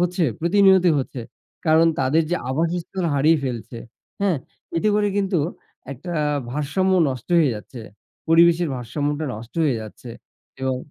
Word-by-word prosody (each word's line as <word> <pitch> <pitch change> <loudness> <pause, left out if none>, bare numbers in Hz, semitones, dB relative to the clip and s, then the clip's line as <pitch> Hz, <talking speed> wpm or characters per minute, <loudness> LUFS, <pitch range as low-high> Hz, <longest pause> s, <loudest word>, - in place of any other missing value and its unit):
হচ্ছে, 175 -1 +1 0.2
প্রতিনিয়তই 185 0 +5
হচ্ছে। 130 -1 -4 0.5
কারণ, 160 +1 +5
তাদের 140 +5 +2
যে 175 - +2
আবাসস্থল 170 +5 -2
হারিয়ে 155 +3 +4
ফেলছে, 120 -2 -5 0.4
হ্যাঁ? 195 -4 +2 0.4
এতে 190 +6 +2
করে 210 0 +2
কিন্তু 195 -3 +1 0.5
একটা 165 +7 -7 0.4
ভারসাম্য 150 +8 0 0.2
নষ্ট 130 +1 -6
হয়ে 150 -6 +3
যাচ্ছে। 115 +3 -9 0.5
পরিবেশের 170 +1 +5
ভারসাম্যটা 145 +5 -3
নষ্ট 110 +2 -10
হয়ে 135 -6 +1
যাচ্ছে 110 +3 -10 0.5
এবং 130 -1 0
160 Hz, 130 wpm, -22 LUFS, 130-175 Hz, 0.5 s, প্রতিনিয়তই